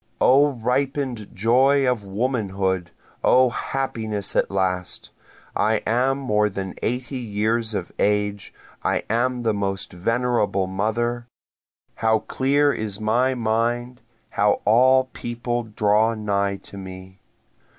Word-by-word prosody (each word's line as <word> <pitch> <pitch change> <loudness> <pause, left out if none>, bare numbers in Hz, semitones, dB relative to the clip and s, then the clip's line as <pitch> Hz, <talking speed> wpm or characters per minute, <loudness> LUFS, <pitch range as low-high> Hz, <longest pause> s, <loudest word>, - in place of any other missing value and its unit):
O 140 +2 +5
ripen'd 125 -1 -1
joy 130 +6 +3
of 125 -4 0
womanhood! 95 -4 -1 0.3
O 130 -1 +5
happiness 110 -7 -3
at - - +2
last! 90 -2 -2 0.4
I 110 +2 +2
am 130 +4 +2
more 105 -6 +1
than 95 -1 -5
eighty 125 +2 -2
years 110 0 -1
of 90 - -4
age, 105 -1 0 0.3
I - - 0
am 120 +1 0
the 110 -2 +2
most 95 -2 -3
venerable 115 0 0
mother, 115 +5 -2 0.7
How 110 0 +3
clear 140 +5 +1
is 105 -2 -3
my 120 +5 +1
mind 120 +2 -1 0.3
how 105 0 +2
all 130 +4 +5
people 120 0 -3
draw 110 +1 +2
nigh 100 -2 0
to 100 - -11
me! 95 0 -10
110 Hz, 120 wpm, -23 LUFS, 100-125 Hz, 0.7 s, O